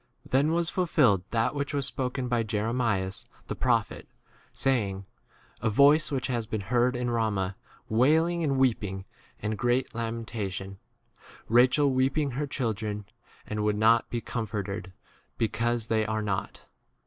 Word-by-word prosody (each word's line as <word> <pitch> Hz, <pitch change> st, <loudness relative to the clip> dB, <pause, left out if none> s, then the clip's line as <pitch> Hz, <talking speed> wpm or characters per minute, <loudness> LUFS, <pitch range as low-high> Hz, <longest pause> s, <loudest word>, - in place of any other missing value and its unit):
Then 140 Hz, +4 st, +2 dB
was 170 Hz, 0 st, +1 dB
fulfilled 125 Hz, -, +3 dB
that 115 Hz, +3 st, +1 dB
which 140 Hz, 0 st, -3 dB
was 140 Hz, -2 st, 0 dB
spoken 130 Hz, 0 st, -2 dB
byj 120 Hz, -2 st, 0 dB
Jeremias 105 Hz, -3 st, -1 dB, 0.2 s
the -, -, -4 dB
pro -, -, +3 dB
18 -, -, -11 dB
phet, -, -, -11 dB, 0.5 s
saying, 100 Hz, -8 st, 0 dB, 0.6 s
A 110 Hz, -, +1 dB
voice 145 Hz, +7 st, +5 dB
has 125 Hz, -5 st, -2 dB
been 110 Hz, -1 st, -3 dB
heard 120 Hz, +5 st, +1 dB
in 125 Hz, 0 st, -1 dB
Rama, 100 Hz, -5 st, 0 dB, 0.3 s
wailing, 160 Hz, +9 st, +3 dB
and 140 Hz, -3 st, +1 dB
weep 130 Hz, -5 st, +2 dB
ing, 95 Hz, -1 st, -5 dB, 0.4 s
and 110 Hz, +1 st, -1 dB
great 120 Hz, +1 st, +1 dB
lamentation: 110 Hz, -4 st, -4 dB, 0.7 s
Ra 120 Hz, +3 st, +6 dB
chel 145 Hz, +1 st, +2 dB
weeping 135 Hz, +3 st, +1 dB
her 145 Hz, +4 st, -2 dB
children, 110 Hz, -5 st, -3 dB, 0.4 s
and 105 Hz, 0 st, -3 dB
would 105 Hz, 0 st, +1 dB
not 115 Hz, +2 st, +4 dB
be 120 Hz, -, -2 dB
comforted, 105 Hz, -4 st, -4 dB, 0.5 s
because 115 Hz, +1 st, 0 dB
they 110 Hz, -1 st, +1 dB
are 110 Hz, 0 st, -2 dB
not. 100 Hz, -2 st, -3 dB
115 Hz, 150 wpm, -28 LUFS, 105-130 Hz, 0.7 s, Ra